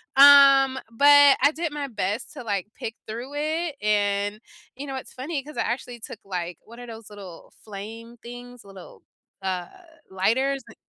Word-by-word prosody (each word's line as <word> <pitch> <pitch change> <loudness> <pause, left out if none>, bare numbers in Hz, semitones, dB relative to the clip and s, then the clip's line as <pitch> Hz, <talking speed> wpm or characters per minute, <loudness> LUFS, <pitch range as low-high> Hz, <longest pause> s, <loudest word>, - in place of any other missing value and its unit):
Um, 275 -1 +7
but 285 +3 +6
I 285 +3 +5
did 330 0 -3
my 290 -2 -4
best 210 0 -3
to, 285 - -9
like, 200 -4 -2
pick 225 - -6
through 240 +6 -7
it, 310 +1 -2
and, 205 0 0 0.4
you 275 +3 -7
know, 270 - -5
it's 260 - -8
funny 280 +3 -4
'cause 300 +2 -12
I - - +1
actually 240 0 -4
took, 220 -1 -9
like, 180 -3 -5
what 235 +2 -15
are 245 - -9
those 225 -2 -10
little 195 -5 -12
flame 225 +3 -9
things, 245 +1 -11
little, 195 -2 -14 0.4
uh, 185 -2 -3 0.4
lighters 260 +8 0
and 230 - -14
235 Hz, 170 wpm, -24 LUFS, 205-275 Hz, 0.4 s, Um